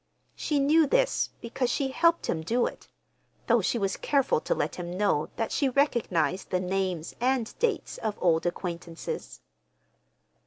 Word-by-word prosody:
She 300 - -1
knew 300 +3 +4
this, - - +2
because 240 +2 -2
she 270 +2 0
helped 335 +4 +3
him 160 - -1
do 235 +9 +1
it—though - - -4
she - - 0
was 195 -3 -1
careful 275 - +1
to - - 0
let 150 - -2
him 175 0 -5
know 200 -7 +1
that 225 - -2
she 275 - +2
recognized 235 - +1
the 185 - +1
names 185 -2 -2
and 250 -2 +1
dates 460 -1 -1
as 215 -2 -2
old 170 -1 +2
acquaintances. 170 -1 -5
220 Hz, 150 wpm, -28 LUFS, 175-275 Hz, -, knew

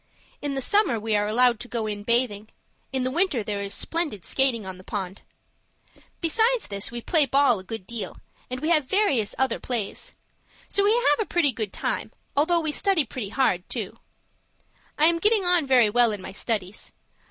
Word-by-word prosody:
In 285 -1 -3
the 270 - -2
summer 340 - +3
we 220 0 -1
are 205 0 +1
allowed 240 +1 +3
to 245 - -7
go 235 -2 -3
in 205 -1 -3
bathing. 220 -2 0 0.4
In 265 -1 0
the 255 - -1
winter 325 - +1
there 205 -1 -3
is 200 0 -4
splendid 310 - -2
skating 255 -6 +1
on 185 -1 -7
the - - -13
pond. 190 -1 -5 1.0
"Besides 450 +8 +1
this, 200 -1 -3
we 235 0 -6
play 300 +2 +3
ball 270 -4 +3
a - - -10
good 205 0 -7
deal, 235 +1 -5 0.3
and 255 +1 -5
we 310 - -1
have 310 -4 +4
various 275 - +1
other 265 -3 0
plays. 235 -6 -3 0.5
So 400 - +1
we 410 - +4
have 485 0 +3
a 440 - -1
pretty 320 -6 +2
good 220 -5 -4
time, - - -3 0.2
although 335 +4 +3
we 310 -1 -1
study 375 -2 +1
pretty 230 -4 -5
hard 195 -7 0
too. - - -5 1.0
I 305 - +4
am 335 +1 +3
getting 425 0 +3
on 355 -5 +2
very 245 -5 +4
well 240 0 +4
in 205 - -4
my 185 - -8
studies. 200 -1 -4
250 Hz, 195 wpm, -25 LUFS, 210-320 Hz, 1.0 s, have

